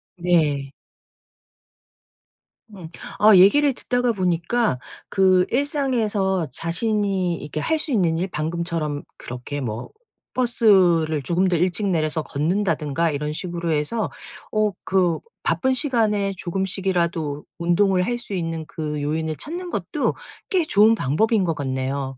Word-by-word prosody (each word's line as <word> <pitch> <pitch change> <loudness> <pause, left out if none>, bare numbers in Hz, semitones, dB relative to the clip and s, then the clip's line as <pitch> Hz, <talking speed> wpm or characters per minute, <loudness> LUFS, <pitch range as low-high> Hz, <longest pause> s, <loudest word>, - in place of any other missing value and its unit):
네. 155 -6 +1 2.0
음. 175 -4 -9 0.3
아 210 -1 +7
얘기를 280 +10 +6
듣다가 245 0 0
보니까 185 - 0 0.3
그 185 -1 +4
일상에서 230 - 0
자신이 190 - 0
이렇게 150 +1 -5
할 320 - +1
수 305 - -2
있는 175 -9 +2
일 180 +3 -1
방금처럼 160 -2 -3 0.2
그렇게 125 +4 -6
뭐 115 -2 -5 0.4
버스를 185 - +3
조금 175 +6 +1
더 180 - +1
일찍 185 +4 +1
내려서 160 -3 0
걷는다든가 165 -1 0
이런 150 +1 -3
식으로 170 0 -3
해서 155 +9 -1 0.4
어 215 -1 +1
그 180 -3 +1 0.2
바쁜 260 0 +1
시간에 215 -8 +1
조금씩이라도 175 -5 -2
운동을 180 +2 +2
할 240 +3 -1
수 240 -4 -7
있는 165 -3 -3
그 150 -2 -4
요인을 155 +2 -2
찾는 350 +4 -5
것도 - - -1 0.4
꽤 365 -5 +2
좋은 215 -4 +5
방법인 210 - +1
것 165 - 0
같네요. 135 -1 -3
180 Hz, 265 characters per minute, -22 LUFS, 155-210 Hz, 2.0 s, 아